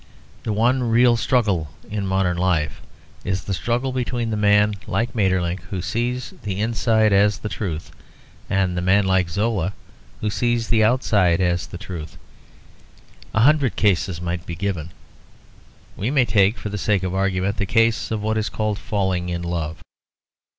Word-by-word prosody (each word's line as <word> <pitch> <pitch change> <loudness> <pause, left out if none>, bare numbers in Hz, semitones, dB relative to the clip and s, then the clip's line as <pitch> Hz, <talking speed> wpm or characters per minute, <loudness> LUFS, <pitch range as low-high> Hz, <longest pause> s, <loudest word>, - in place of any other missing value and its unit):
The 110 - -3
one 120 +5 +2
real 120 +1 +5
struggle 110 - +1 0.2
in 100 -2 -3
modern 95 -2 +1
life 85 -4 0 0.4
is 95 -1 -2
the 100 - -3
struggle 120 +7 -1
between 120 -2 -2
the - - 0
man 105 0 +4
like 120 +1 -1
Maeterlinck, 95 -4 0
who 95 - -3
sees 120 +5 -2
the 100 -2 -4
inside 110 -1 +2
as 100 +1 +4
the 105 - -5
truth, 85 -8 -4 0.6
and 95 -2 +1
the 90 - -1
man 100 +3 +3
like 95 -2 +2
Zola, 100 0 -1 0.5
who 105 - -1
sees 120 +1 0
the 110 -1 +4
outside 105 -7 +3
as 90 -2 0
the - - -8
truth. 85 -5 -8 1.2
A 110 - +4
hundred 140 -1 +4
cases 95 -4 +1
might 90 0 -4
be 85 - -4
given. 90 -3 -3 1.1
We 105 - -2
may 135 -3 +3
take, 110 -1 +3
for 105 - -5
the 105 0 -4
sake 100 -2 +1
of 95 -1 -2
argument, 95 0 0
the 100 - -1
case 115 +1 +2
of 110 -2 -2
what 110 +1 0
is 110 - -1
called 110 -1 -2
falling 95 -3 -1
in 85 0 -3
love. 85 -1 -4
100 Hz, 165 wpm, -22 LUFS, 90-110 Hz, 1.2 s, real